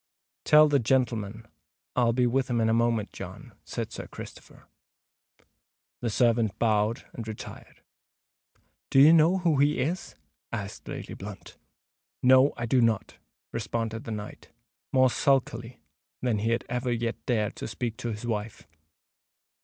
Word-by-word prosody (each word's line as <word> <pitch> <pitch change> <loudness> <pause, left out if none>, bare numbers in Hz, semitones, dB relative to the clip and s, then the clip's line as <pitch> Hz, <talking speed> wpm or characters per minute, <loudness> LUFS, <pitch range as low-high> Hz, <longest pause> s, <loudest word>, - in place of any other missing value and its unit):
"Tell 150 0 +7
the 145 -1 +3
gentleman 115 -3 0 0.5
I'll 120 -2 +3
be 125 +1 +2
with 130 +1 +1
him 120 -1 +1
in 110 0 +2
a - - +3
moment, 115 -2 +1
John," - - -9
said - - -5
Sir - - -7
Christopher. - - -11 1.4
The 120 - -1
servant 115 -1 +2
bowed 110 0 +1
and 115 -2 -7
retired. 110 -1 -9 1.1
"Do 135 - +4
you 150 +4 +9
know 165 +3 +5
who 170 -6 +1
he 145 +1 +3
is?" 160 +8 -2 0.4
asked - - -6
Lady - - -6
Blunt. - - -9 0.7
"No, 130 +2 +6
I 120 - -2
do 125 +2 +3
not," 115 -3 0 0.3
responded 115 0 -3
the 115 - -5
knight, 105 -1 -7 0.4
more 130 -1 +4
sulkily 125 - 0 0.4
than 120 -4 0
he 110 +2 0
had 115 +1 0
ever 125 +1 -2
yet 115 0 -2
dared 110 -3 0
to - - -5
speak 115 +1 -4
to 120 - -4
his 105 +2 -6
wife. 110 -2 -4
120 Hz, 145 wpm, -27 LUFS, 110-130 Hz, 1.4 s, you